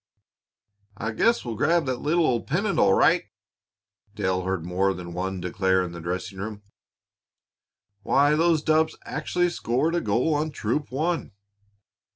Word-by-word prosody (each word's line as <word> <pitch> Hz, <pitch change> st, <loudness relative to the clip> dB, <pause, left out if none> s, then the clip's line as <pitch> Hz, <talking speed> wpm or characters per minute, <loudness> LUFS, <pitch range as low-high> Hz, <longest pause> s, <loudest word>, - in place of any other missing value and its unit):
"I 110 Hz, +2 st, -3 dB
guess 230 Hz, -, +2 dB
we'll 120 Hz, -, -3 dB
grab 165 Hz, +7 st, +2 dB
that 130 Hz, -2 st, -2 dB
little 165 Hz, +3 st, +2 dB
old 120 Hz, -5 st, 0 dB
pennant, 195 Hz, +7 st, 0 dB
all 95 Hz, -1 st, +5 dB
right," -, -, +4 dB, 0.9 s
Dale 95 Hz, -3 st, 0 dB
heard 95 Hz, -2 st, -2 dB
more 95 Hz, +2 st, 0 dB
than 85 Hz, -1 st, -8 dB
one 95 Hz, +1 st, -3 dB
declare 95 Hz, +1 st, +1 dB
in 90 Hz, -, -5 dB
the 85 Hz, -1 st, -8 dB
dressing 90 Hz, +3 st, -4 dB
room. 105 Hz, 0 st, -6 dB, 1.4 s
"Why, 140 Hz, +7 st, +3 dB
those 165 Hz, -1 st, +2 dB
dubs 155 Hz, 0 st, +2 dB
actually 175 Hz, 0 st, -1 dB
scored 150 Hz, +2 st, 0 dB
a 175 Hz, -, +1 dB
goal 120 Hz, +9 st, +1 dB
on 150 Hz, +1 st, 0 dB
Troop 140 Hz, +1 st, -2 dB
One!" 160 Hz, -, -2 dB
115 Hz, 150 wpm, -25 LUFS, 95-155 Hz, 1.4 s, all